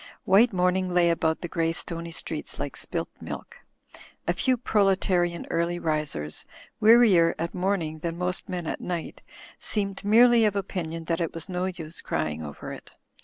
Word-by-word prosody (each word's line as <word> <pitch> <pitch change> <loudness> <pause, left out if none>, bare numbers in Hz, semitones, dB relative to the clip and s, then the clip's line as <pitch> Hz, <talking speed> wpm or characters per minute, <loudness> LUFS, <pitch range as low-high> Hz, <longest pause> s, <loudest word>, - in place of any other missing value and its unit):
White 215 +6 +5
morning 185 0 +1
lay 175 -1 +4
about 160 -1 0
the 175 - -3
grey 165 -1 0
stoney 170 0 -4
streets - - -4
like - - -4
spilt - - -3
milk. - - -8 0.7
A - - +3
few 255 -1 +1
proletarian 190 -6 +1
early 170 +1 0
risers, 150 - -2 0.4
wea 220 +2 +7
rier 190 -9 +5
at 170 +1 -3
morning 180 -4 -1
than 165 +1 -3
most 180 +1 -3
men 175 -2 -3
at - - -4
night, 175 -3 -4 0.4
seemed 200 -2 -2
merely 230 +3 +6
of 210 -2 +2
opinion 165 -4 -3
that 165 +1 -1
it 165 - -2
was 165 +4 -5
no 180 0 -1
use 170 -3 -5
crying 80 0 -2
over 75 -2 -7
it. - - -11
175 Hz, 170 wpm, -26 LUFS, 165-195 Hz, 0.7 s, wea